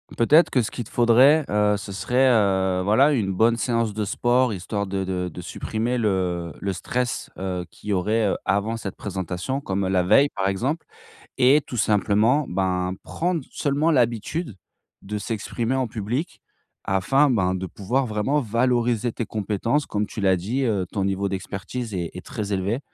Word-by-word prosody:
Peut-être 150 Hz, +8 st, +5 dB
que 125 Hz, -, +2 dB
ce 110 Hz, -, -3 dB
qu'il 120 Hz, -, -5 dB
te -, -, -14 dB
faudrait, 130 Hz, +6 st, +5 dB
heu, 105 Hz, 0 st, +2 dB
ce 100 Hz, 0 st, -7 dB
serait, 125 Hz, +7 st, +2 dB
heu, 95 Hz, -5 st, +2 dB
voilà 120 Hz, +10 st, +4 dB
une 105 Hz, -8 st, 0 dB
bonne 115 Hz, +5 st, +3 dB
séance 115 Hz, -3 st, 0 dB
de 105 Hz, 0 st, -2 dB
sport. 120 Hz, +3 st, +1 dB
Histoire 100 Hz, +2 st, -3 dB
de 95 Hz, 0 st, -2 dB
de 90 Hz, -1 st, -2 dB
de 90 Hz, -, -8 dB
supprimer 115 Hz, +3 st, -3 dB
le 90 Hz, -6 st, -1 dB
le 100 Hz, -, -1 dB
stress, 125 Hz, +7 st, -3 dB
heu, 90 Hz, -2 st, -3 dB
qu'il 105 Hz, -, -11 dB
y -, -, +2 dB
aurait, 105 Hz, +4 st, +1 dB
heu, -, -, 0 dB
avant 105 Hz, +3 st, 0 dB
cette 100 Hz, -4 st, -6 dB
présentation, 95 Hz, +6 st, -4 dB
comme, 100 Hz, -7 st, -2 dB
heu, -, -, -1 dB
la 95 Hz, -1 st, +2 dB
veille, 135 Hz, +10 st, +5 dB
par 95 Hz, -6 st, -2 dB
exemple. 130 Hz, -, -1 dB, 0.5 s
Et 135 Hz, +4 st, +5 dB
tout 125 Hz, -, -6 dB
simplement 110 Hz, +6 st, +2 dB
ben, 90 Hz, 0 st, -1 dB
prendre 175 Hz, -1 st, -1 dB
seulement 145 Hz, +3 st, +1 dB
l'habitude 120 Hz, -, 0 dB, 0.5 s
de 105 Hz, +2 st, -4 dB
s'exprimer 115 Hz, +4 st, -2 dB
en 130 Hz, -2 st, 0 dB
public 115 Hz, -, -4 dB, 0.4 s
afin 125 Hz, +10 st, +2 dB
ben, 95 Hz, -7 st, +1 dB
de 95 Hz, 0 st, -4 dB
pouvoir 120 Hz, +8 st, -1 dB
vraiment 115 Hz, +6 st, 0 dB
valoriser 120 Hz, 0 st, +1 dB
tes 115 Hz, -, -3 dB
compétences. 110 Hz, +8 st, -1 dB
Comme 105 Hz, 0 st, -1 dB
tu 105 Hz, -, -8 dB
l'as 95 Hz, -2 st, +3 dB
dit, 115 Hz, +10 st, -2 dB
heu, 100 Hz, -6 st, 0 dB
ton 100 Hz, -2 st, -1 dB
niveau 100 Hz, 0 st, -1 dB
d'expertise 100 Hz, +5 st, -5 dB
est 85 Hz, -3 st, -2 dB
est 90 Hz, -, -9 dB
très 105 Hz, -2 st, -5 dB
élevé. 100 Hz, +5 st, -1 dB
105 Hz, 180 wpm, -23 LUFS, 95-125 Hz, 0.5 s, Peut-être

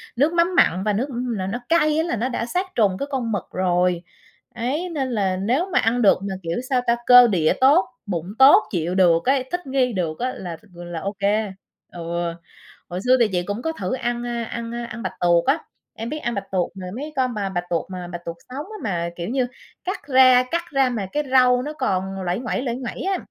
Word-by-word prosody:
nước 290 Hz, +7 st, +2 dB
mắm 345 Hz, +1 st, +2 dB
mặn 185 Hz, -, +4 dB
và 210 Hz, 0 st, +1 dB
nước 235 Hz, +7 st, -1 dB, 0.3 s
là 185 Hz, -1 st, -3 dB
nó 225 Hz, +5 st, -3 dB
cay 310 Hz, -2 st, +3 dB
á 320 Hz, -, +2 dB
là 335 Hz, -, -1 dB
nó 235 Hz, +3 st, -1 dB
đã 235 Hz, -, -2 dB
sát 360 Hz, +10 st, -1 dB
trùng 200 Hz, -5 st, +2 dB
cái 280 Hz, -, -3 dB
con 250 Hz, -4 st, -1 dB
mực 205 Hz, -4 st, -1 dB
rồi. 180 Hz, -1 st, +1 dB, 0.5 s
Đấy, 275 Hz, +10 st, -2 dB
nên 280 Hz, -6 st, -2 dB
là 195 Hz, -5 st, 0 dB
nếu 245 Hz, -, +1 dB
mà -, -, +4 dB
ăn 235 Hz, +2 st, +1 dB
được 205 Hz, -, +5 dB
mà, 195 Hz, -1 st, -3 dB
kiểu, 165 Hz, 0 st, -2 dB
sao 255 Hz, -2 st, +2 dB
ta, 235 Hz, -, +4 dB
cơ 245 Hz, -1 st, +9 dB
địa 170 Hz, -8 st, +2 dB
tốt, 290 Hz, +8 st, +6 dB, 0.2 s
bụng 175 Hz, -5 st, -3 dB
tốt, 290 Hz, +11 st, +8 dB
chịu 175 Hz, -1 st, -1 dB
được 170 Hz, -3 st, +4 dB
ấy, 265 Hz, 0 st, +3 dB
thích 355 Hz, -4 st, -3 dB
nghi 260 Hz, -2 st, +1 dB
được 165 Hz, -5 st, -2 dB
á 255 Hz, +1 st, -1 dB
là 175 Hz, -3 st, -6 dB
th -, -, -24 dB
là 175 Hz, -1 st, -6 dB
ô 200 Hz, +5 st, -3 dB
kê. 205 Hz, +1 st, +1 dB, 0.4 s
Ừ. 170 Hz, 0 st, -3 dB, 0.6 s
Hồi 180 Hz, +1 st, -4 dB
xưa 255 Hz, +1 st, +5 dB
thì 235 Hz, -, +5 dB
chị 180 Hz, -1 st, 0 dB
cũng 205 Hz, +5 st, -4 dB
có 320 Hz, -, -1 dB
thử 320 Hz, -, -4 dB
ăn, 240 Hz, -2 st, -2 dB
a, 235 Hz, -1 st, -2 dB
ăn, 230 Hz, 0 st, -5 dB
a, 240 Hz, 0 st, -4 dB
ăn 230 Hz, 0 st, -7 dB
bạch -, -, -3 dB
tuộc 170 Hz, -1 st, +4 dB
á. 275 Hz, +5 st, +3 dB, 0.4 s
Em 225 Hz, +1 st, -4 dB
biết 305 Hz, -, -3 dB
ăn 240 Hz, -6 st, -3 dB
bạch 200 Hz, -, -2 dB
tuộc 185 Hz, -2 st, 0 dB
mà 185 Hz, -1 st, -7 dB
mấy 295 Hz, +5 st, -6 dB
con 255 Hz, -2 st, +1 dB
mà 205 Hz, -3 st, -2 dB
bạch 175 Hz, -2 st, -2 dB
tuộc 170 Hz, -2 st, -1 dB
mà 180 Hz, -1 st, -6 dB
bạch 175 Hz, -1 st, -7 dB
tuộc 170 Hz, 0 st, -5 dB
sống 275 Hz, +4 st, -5 dB
á, 430 Hz, +2 st, -9 dB
mà, 170 Hz, -4 st, -1 dB
kiểu 175 Hz, +2 st, -5 dB
như, 255 Hz, 0 st, 0 dB, 0.4 s
cắt 370 Hz, -6 st, -5 dB
ra 255 Hz, -2 st, +6 dB
cắt 340 Hz, -, +1 dB
ra 270 Hz, -2 st, +3 dB
mà 220 Hz, -6 st, -3 dB
cái 295 Hz, -, 0 dB
rau 250 Hz, -1 st, +5 dB
nó 295 Hz, +4 st, -5 dB
còn 195 Hz, -8 st, -2 dB
nguây 180 Hz, +3 st, -1 dB
nguẩy, 240 Hz, 0 st, -2 dB
nguây 245 Hz, -3 st, -2 dB
nguẩy 250 Hz, -2 st, -6 dB
á. 385 Hz, 0 st, 0 dB
235 Hz, 245 wpm, -22 LUFS, 185-265 Hz, 0.6 s, cơ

